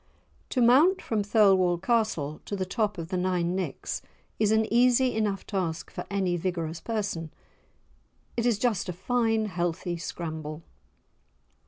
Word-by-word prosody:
To 255 - 0
mount 300 +11 +6
from 220 -2 -1
Thirlwall 195 -4 +4
Castle 190 -7 0
to 205 - -3
the 190 -1 -2
top 205 0 -1
of 165 -1 -6
the 185 - -1
Nine 180 -1 0
Nicks 190 -1 -3 0.4
is 215 -1 +3
an 220 0 +3
easy 250 +1 +4
enough 205 -3 -1
task 175 -5 -3
for - - -6
any 190 -3 0
vigorous 170 -2 -3
person. 195 -8 -3 1.0
It 235 0 +1
is 235 -4 +2
just 215 -5 0
a - - -2
fine 225 +4 +1
healthy 175 -2 -2
scramble. 160 -2 -5
190 Hz, 145 wpm, -27 LUFS, 175-220 Hz, 1.0 s, mount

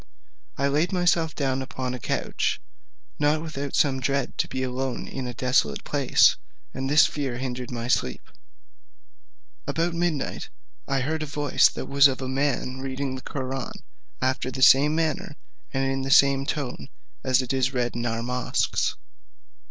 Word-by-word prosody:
I 140 - +1
laid 150 +5 +1
myself 175 -3 +1
down 135 -2 -1
upon 130 -1 -4
a 125 - -5
couch, - - -1 0.6
not 150 +1 +3
without 145 -3 -4
some 135 -3 +2
dread 140 0 -1
to - - +1
be 130 - -3
alone 130 0 -3
in 130 -2 -5
a 125 - -5
desolate 120 - +1
place; - - +4 0.4
and 135 +1 -3
this 150 +2 +6
fear 135 -5 -3
hindered 125 -1 -4
my 120 -1 -4
sleep. 65 - 0 1.4
About 170 +1 0
midnight 170 -4 -2 0.4
I 135 -1 0
heard 155 +4 -2
a 155 - -3
voice 145 -1 +3
like - - -4
that 140 0 +6
of 130 -1 -3
a - - -3
man 130 -1 -1
reading 135 0 -3
the 130 - -6
Koraun, 135 -1 -5 0.4
after 130 0 0
the 130 +1 -1
same 145 +4 +6
manner, 160 -2 -1 0.4
and 135 0 0
in 135 0 -1
the 135 - -3
same 135 0 +5
tone 140 -2 -4 0.3
as 130 0 +3
it 130 +1 -3
is 130 -1 +1
read 125 -2 -1
in 120 0 -2
our 115 0 -2
mosques. 125 0 0
135 Hz, 165 wpm, -25 LUFS, 130-145 Hz, 1.4 s, this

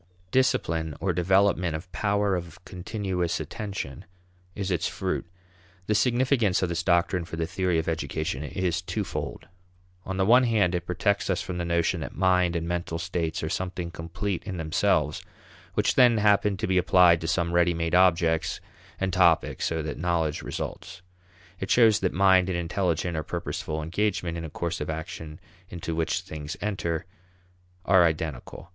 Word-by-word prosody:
Discipline 80 - +1
or 95 -2 0
development 90 -1 +2
of 90 +4 -8
power 100 -1 +1
of 85 -1 -6
continuous 90 -1 -3
attention 100 -11 -5 0.5
is 100 -1 -3
its 85 -1 0
fruit. 95 -1 -3 0.6
The 105 - +1
significance 120 -3 +2
of 90 - 0
this 85 0 -1
doctrine 90 0 +2
for 80 - -7
the 80 0 -1
theory 90 0 0
of 80 - -1
education 80 -2 -2
is 85 +2 -1
twofold. 90 - -4 0.6
On 95 +1 -4
the 95 - +2
one 125 +4 +6
hand 105 -6 +2
it 90 - -3
protects 100 +4 0
us 95 -1 0
from 90 -1 -5
the 85 - -2
notion 85 +1 +1
that 70 - -6
mind 90 -1 +2
and 85 0 -2
mental 85 -1 -2
states 80 -2 -2
are 80 - -2
something 90 -1 -3
complete 90 +3 -4
in 95 -3 -5
themselves, 80 -1 +1 0.5
which - - +2
then 120 -3 +5
happen 105 -1 +3
to - - -2
be 95 -1 +2
applied 90 -2 +5
to 80 - -3
some 85 +1 0
ready 85 0 +3
made 85 0 -2
objects 85 -3 +3 0.4
and 95 -1 -1
topics 85 -2 +3
so 80 -1 -1
that 75 -2 -5
knowledge 85 -3 0
results. 90 0 -6 0.6
It 95 - -4
shows 110 -3 +5
that 95 -2 0
mind 95 0 +4
and 90 - -1
intelligent 85 -1 -1
or 80 - -1
purposeful 80 0 -4
engagement 90 0 -1
in 85 0 -5
a - - -6
course 85 +2 -3
of 75 - -3
action 80 0 -6 0.3
into 85 -1 -5
which 80 0 0
things 75 0 -7
enter 90 -6 -2 0.8
are 95 -1 +6
identical. 80 +1 -3
90 Hz, 165 wpm, -26 LUFS, 80-95 Hz, 0.8 s, one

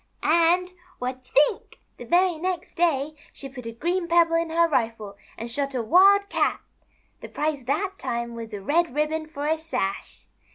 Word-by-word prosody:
" - - -40
And, 340 +3 +3 0.3
what 255 0 -5
you 285 - +8
think! - - -5 0.2
The - - -9
very 350 -1 +2
next 365 0 -3
day 310 -4 +1 0.2
she 275 - -9
put 255 -3 -9
a - - -4
green 340 +9 -2
pebble 335 -1 +4
in 330 0 +1
her 335 +1 +3
rifle 225 -8 -2 0.2
and 230 - -5
shot 275 +2 -3
a 245 - -1
Wild 395 - +5
Cat. - - 0 0.6
The - - -9
prize 295 -4 -2
that 370 +9 -2
time 235 0 -3
was 230 -1 -8
a 205 -2 -6
red 315 - +1
ribbon 310 +1 -1
for 295 -2 -6
a 315 +1 +1
sash. 315 -12 -4
310 Hz, 190 wpm, -25 LUFS, 255-340 Hz, 0.6 s, you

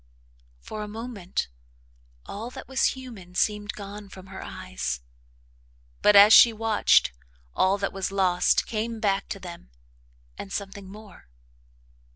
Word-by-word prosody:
For 215 - -7
a 210 - -5
moment, 215 -4 -4 0.8
all 220 +4 -6
that - - -10
was 265 0 +1
human 210 -9 -11
seemed 210 +1 0
gone 205 0 -9
from 190 -1 -12
her 190 - -7
eyes, 60 +1 -5 1.0
but, 210 - +5
as 205 +2 +9
she 235 - +9
watched, 220 - +3 0.4
all 190 +2 +3
that 200 -1 -3
was 195 0 -3
lost 185 -2 +2
came 225 +1 -3
back 200 -2 0
to 195 - -5
them, 175 - -10 0.7
and 195 - -7
something 200 -1 -6
more. 205 - -13
200 Hz, 135 wpm, -26 LUFS, 190-215 Hz, 1.0 s, as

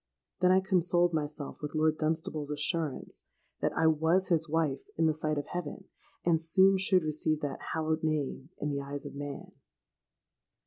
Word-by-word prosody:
Then 180 - +4
I 190 +1 +5
consoled 175 -2 +2
myself 150 -2 -4
with 150 0 -5
Lord 155 0 +2
Dunstable's 155 -1 -1
assurance 150 0 -2 0.4
that - - 0
I 160 - +3
was 160 +4 +3
his 165 -2 +2
wife 150 -4 0 0.2
in 165 - +3
the 160 - +3
sight 155 0 -2
of 145 - -2
heaven, 175 -5 -5 0.4
and 165 -2 +3
soon 190 +4 +4
should 185 -2 +4
receive 155 0 -1
that 145 -2 -3 0.2
hallowed 160 0 0
name 150 -3 -2
in 150 - -2
the 140 0 -2
eyes 140 +1 -6
of - - -7
man. 145 0 -7
155 Hz, 170 wpm, -30 LUFS, 150-170 Hz, 0.4 s, I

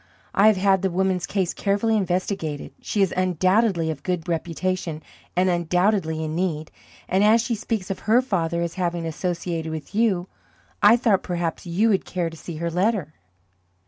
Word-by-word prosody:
I 205 - +5
have 215 -2 +5
had 190 0 +3
the 190 - +1
woman's 185 0 0
case 190 -4 -1
carefully 205 +3 +1
investigated. 180 -6 -2
She 205 - +1
is 190 - 0
undoubtedly 185 0 +2
of 145 -3 -7
good 180 +1 -2
reputation, 170 -1 -2 0.3
and 180 +1 +3
undoubtedly 175 -1 +1
in 155 0 -3
need; 160 -3 -2 0.4
and 190 +2 +2
as 220 +2 +6
she 235 +1 -1
speaks 215 -3 -3
of 190 - -4
her 235 +3 +6
father 170 -8 -1
as 170 -1 -3
having 175 -2 -2
associated 165 -1 -3
with 160 +2 -7
you, 200 -5 +1 0.5
I 215 +3 +7
thought 220 -6 +2
perhaps 175 -1 -3
you 195 +7 +2
would 195 -3 +2
care 175 -2 -2
to - - -10
see 165 +1 -8
her 170 +2 -3
letter." 185 -3 0
180 Hz, 175 wpm, -23 LUFS, 165-200 Hz, 0.5 s, I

